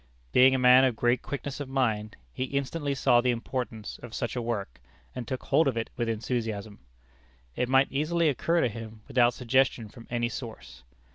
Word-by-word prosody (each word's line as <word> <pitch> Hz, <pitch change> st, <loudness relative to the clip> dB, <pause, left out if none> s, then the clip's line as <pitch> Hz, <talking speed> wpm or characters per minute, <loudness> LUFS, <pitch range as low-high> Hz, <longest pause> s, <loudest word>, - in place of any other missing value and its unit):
Being 130 Hz, +1 st, +6 dB
a -, -, +2 dB
man 125 Hz, +1 st, +7 dB
of 130 Hz, -3 st, +2 dB
great 120 Hz, +2 st, +1 dB
quickness 140 Hz, +2 st, -5 dB
of 145 Hz, -2 st, -5 dB
mind, 110 Hz, -6 st, -1 dB, 0.2 s
he 130 Hz, -, -2 dB
instantly 140 Hz, +2 st, -2 dB
saw 120 Hz, -2 st, +4 dB
the 125 Hz, -, +1 dB
importance 120 Hz, -2 st, -4 dB
of 120 Hz, -2 st, -9 dB
such 120 Hz, -, -3 dB
a 125 Hz, -, -1 dB
work, 110 Hz, -, -4 dB, 0.3 s
and 125 Hz, -2 st, -6 dB
took 130 Hz, -, -4 dB
hold 145 Hz, +2 st, +3 dB
of 130 Hz, -4 st, 0 dB
it 115 Hz, -, -3 dB
with 120 Hz, -1 st, -1 dB
enthusiasm. 110 Hz, -2 st, -3 dB, 0.8 s
It 125 Hz, -, -1 dB
might 135 Hz, +1 st, +4 dB
easily 160 Hz, +4 st, +1 dB
occur 165 Hz, +4 st, +1 dB
to -, -, +3 dB
him 110 Hz, -1 st, -8 dB
without 120 Hz, -1 st, +3 dB
suggestion 125 Hz, -2 st, +1 dB
from 115 Hz, +2 st, -14 dB
any 120 Hz, -1 st, 0 dB
source. 115 Hz, -2 st, -8 dB
125 Hz, 190 wpm, -28 LUFS, 115-135 Hz, 0.8 s, man